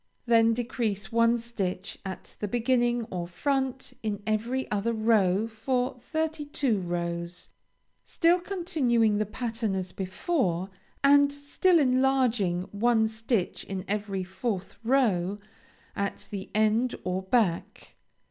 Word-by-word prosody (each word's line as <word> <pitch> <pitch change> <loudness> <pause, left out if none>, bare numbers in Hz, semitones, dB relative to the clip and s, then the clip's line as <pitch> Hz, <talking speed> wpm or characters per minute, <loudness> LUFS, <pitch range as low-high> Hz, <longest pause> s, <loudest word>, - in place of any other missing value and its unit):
Then 230 -1 +4
decrease 230 -4 -2
one 230 +1 +4
stitch 200 -5 -4
at 190 -1 -7
the 210 - -2
beginning 240 +1 +1
or 175 -2 -3
front 265 +6 -2
in 210 -2 -3
every 230 +5 -1
other 210 +3 0
row 215 -3 +3
for 250 +3 -2
thirty 315 +3 -2
two 270 -7 0
rows, 170 0 -4 0.5
still 345 0 +3
continuing 275 - +1
the 215 - 0
pattern 225 -2 -2
as 185 -1 -3
before, 190 - -1 0.3
and 285 0 +6
still 285 +5 +2
enlarging 255 - +2
one 220 +1 +3
stitch 220 -3 -2
in 190 -1 -5
every 200 -2 -2
fourth 190 +1 -4
row, 205 -7 +2 0.6
at 200 0 -3
the 195 -2 -5
end 220 +3 +2
or 185 +1 -1
back. 190 -3 -1
225 Hz, 120 wpm, -28 LUFS, 195-255 Hz, 0.6 s, and